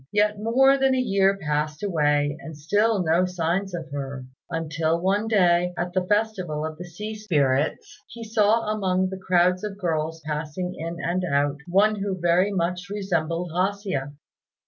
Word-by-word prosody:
Yet 210 0 +2
more 265 +5 +4
than 265 -1 +3
a - - 0
year 195 -5 +2
passed 150 -1 -2
away 145 -6 +1
and 160 -2 -9
still 205 +6 +1
no 170 +2 +3
signs 180 +2 -1
of 160 -3 -7
her, 135 -2 -5 0.2
until 165 0 -1
one 200 +4 +1
day, 180 -4 +3
at 175 0 -3
the 185 -1 0
festival 190 -8 0
of 155 0 -6
the 180 - -6
Sea 210 +6 -6
Spirits, 150 -10 0
he 235 - -9
saw 220 0 +2
among 185 -3 0
the 190 - -6
crowds 180 0 +2
of 205 -2 -5
girls 165 -3 -2
passing 155 +4 -3
in 165 +1 -5
and 180 +2 -1
out 145 -3 +1
one 205 +4 +3
who 195 -2 -3
very 175 +4 +3
much 180 +1 -2
resembled 175 -4 -2
A 185 +3 +1
hsia. 165 -9 -4
180 Hz, 170 wpm, -24 LUFS, 160-205 Hz, 0.2 s, more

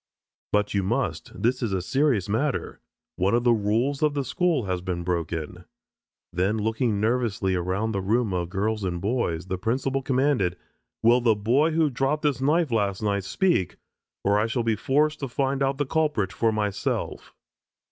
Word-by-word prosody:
"But 105 0 +1
you 100 - +2
must. 95 - -3
This 125 +3 +1
is 115 -5 -1
a 95 - +1
serious 130 -4 +1
matter. 125 +7 -1 0.4
One 95 +5 +2
of 120 - +1
the 120 -1 +5
rules 115 +6 0
of 150 -1 +2
the 140 -2 -1
school 175 -6 +1
has 90 -2 -2
been 90 -1 -3
broken." 85 -3 -3 0.7
Then 95 +5 +1
looking 110 0 0
nervously 110 -4 0
around 95 +5 -1
the 100 -2 -2
room 110 +1 +1
of 85 -2 -2
girls 105 +3 -1
and 90 -2 -2
boys, 95 -5 -1
the 95 0 -4
principal 130 +6 -1
commanded: 130 -9 +1 0.5
"Will 120 +2 +5
the 115 -2 +3
boy 130 +10 +2
who 160 -2 +2
dropped 135 +5 0
this 140 -4 +1
knife 155 +1 +2
last 100 -2 0
night 100 -2 0
speak, 175 - +1 0.5
or 105 +2 +2
shall 120 +1 -1
I 115 -1 +2
be - - -1
forced 150 +7 +1
to 135 - -3
find 135 +2 -1
out 135 0 +1
the 145 - 0
culprit 150 - 0
for 115 -1 +1
myself?" 105 -2 -3
110 Hz, 180 wpm, -25 LUFS, 95-135 Hz, 0.7 s, the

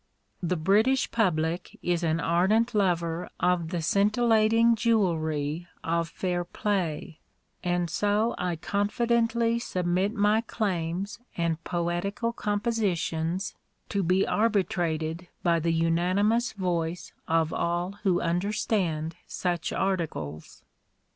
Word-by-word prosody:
The 180 0 0
British 215 +11 +3
public 175 -5 0
is 175 -1 +1
an 160 0 +1
ardent 195 +9 +2
lover 175 -4 0
of 180 -2 +1
the 175 -2 -2
scintillating 220 +4 +4
jewellery 170 -8 0 0.2
of 165 0 0
fair 175 0 -2
play, 175 -4 -2 0.4
and 175 -1 0
so 205 +6 +1
I 180 -1 -1
confidently 230 +5 +1
submit 185 0 0
my 210 +1 +3
claims 195 -2 -2 0.2
and 165 -1 -1
poetical 175 +7 -1
compositions 200 -5 -1 0.4
to 200 - 0
be 185 +2 +2
arbitrated 175 -6 0 0.2
by 170 -1 +3
the 165 +1 0
unanimous 185 +8 +2
voice 175 -4 -2
of 160 -1 +1
all 175 +2 -1
who 185 -4 +2
understand 175 -3 -1
such 175 -3 -2
articles. 155 - -3
180 Hz, 105 wpm, -27 LUFS, 165-210 Hz, 0.4 s, scintillating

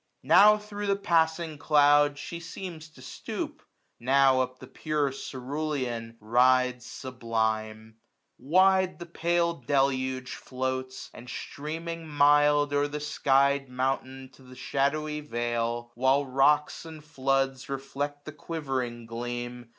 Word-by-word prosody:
Now 210 +1 +7
thro' 205 -1 -6
the 200 - +3
passing 165 -4 0
cloud 145 -1 +4
she 170 +3 -6
seems 170 -2 -8
to 140 -5 -16
stoop. - - -6 0.4
Now 135 +1 +4
up 130 0 -3
the 130 - -11
pure 150 +1 -2
cerulean 130 -4 -4
rides 125 +2 +2
sublime. 110 -3 -3 0.4
1095 - - -50
Wide 185 +6 +3
the 175 - -8
pale 170 0 0
deluge 130 -2 -1
floats; 130 0 -5
and 120 +1 -11
streaming 165 +5 -6
mild 145 0 +4
O'er 145 0 +2
the 150 +1 -5
sky'd 140 -2 +2
mountain 130 +1 -3
to - - -19
the 130 0 -14
shadowy 150 +3 -1
vale. 120 -2 -2
While 130 +3 +2
rocks 140 +3 +2
and 160 -2 -11
floods 135 -3 -1
reflect 140 +2 -4
the 155 - -6
quivering 135 -7 -4
gleam. 120 +1 -6
135 Hz, 125 wpm, -27 LUFS, 125-155 Hz, 0.4 s, Now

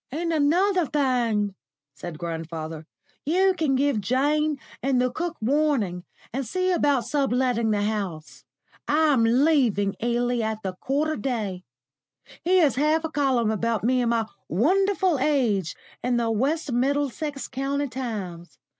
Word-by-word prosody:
"And 335 +4 -2
another 345 +4 +2
thing," 240 -8 +1 0.4
said 155 +3 -8
grandfather, 160 -1 -5 0.4
"you 375 +5 +3
can 300 -6 +1
give 275 -5 +1
Jane 290 +6 +1 0.2
and 265 -1 +1
the 250 0 +1
cook 345 +5 -4
warning, 235 -8 0 0.3
and 270 +2 -1
see 370 +10 -1
about 285 -8 +2
sub 275 +1 0
letting 245 -3 +1
the 205 -1 +1
house. 180 -11 -4 0.4
I'm 295 -5 +3
leaving 235 -5 +3
Ealing 240 +1 0
at 220 0 -3
the 190 -1 -3
quarter 290 +10 -1
day. 210 -9 -3 0.8
Here's 335 -8 +3
half 305 +3 +2
a 320 - -3
column 260 -7 +1
about 225 0 -1
me 250 +2 +2
and 240 - +1
my 230 -1 +1 0.2
wonderful 370 - +2
age 240 - +1 0.3
in 250 -1 +1
the 230 -1 0
West 280 +7 0
Middlesex 280 +3 -1
County 275 +2 -2
Times. 205 -10 -6
255 Hz, 135 wpm, -25 LUFS, 220-295 Hz, 0.8 s, you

